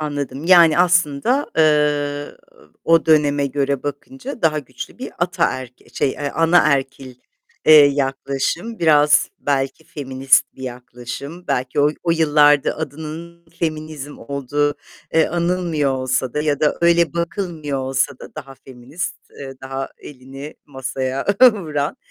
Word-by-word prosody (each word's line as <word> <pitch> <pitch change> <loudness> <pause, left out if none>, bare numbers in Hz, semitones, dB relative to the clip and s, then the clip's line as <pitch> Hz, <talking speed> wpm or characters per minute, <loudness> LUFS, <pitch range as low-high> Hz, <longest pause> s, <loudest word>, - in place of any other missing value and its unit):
Anladım. 145 -2 -4
Yani, 170 -3 +6
aslında, 175 - +2
eee, 150 -2 +1 0.5
o 165 0 +3
döneme 145 -2 +3
göre 140 0 -1
bakınca 250 - -7
daha 155 -2 +2
güçlü 145 - -9
bir - - -6
ataerk 130 -1 -1 0.2
şey, 135 - +1
eee, 145 +1 -4
anaerkil, 140 -6 +1 0.5
eee, 155 - +8
yaklaşım, 140 +9 -2
biraz 150 -2 +4
belki 135 +2 -2
feminist 135 -2 +1
bir 130 - -12
yaklaşım, 125 +6 -8
belki 130 +3 -1
o 145 +1 +4
o 170 - 0
yıllarda 150 -3 +3
adının 160 +3 -7
feminizm 155 -3 -4
olduğu, 140 +3 -2 0.4
eee, 160 -1 +4
anılmıyor 170 -4 0
olsa 130 -1 -2
da 150 - 0
ya 145 -2 0
da 150 - +1
öyle 170 -2 +3
bakılmıyor 170 -4 -3
olsa 130 +1 -1
da - - -12
daha 135 0 -9
feminist, 130 +5 -7 0.2
eee, 135 -1 -9
daha 135 0 -5
elini 135 +2 -10
masaya 130 -1 -4 0.3
vuran. 155 -7 -3
145 Hz, 125 wpm, -20 LUFS, 135-160 Hz, 0.5 s, eee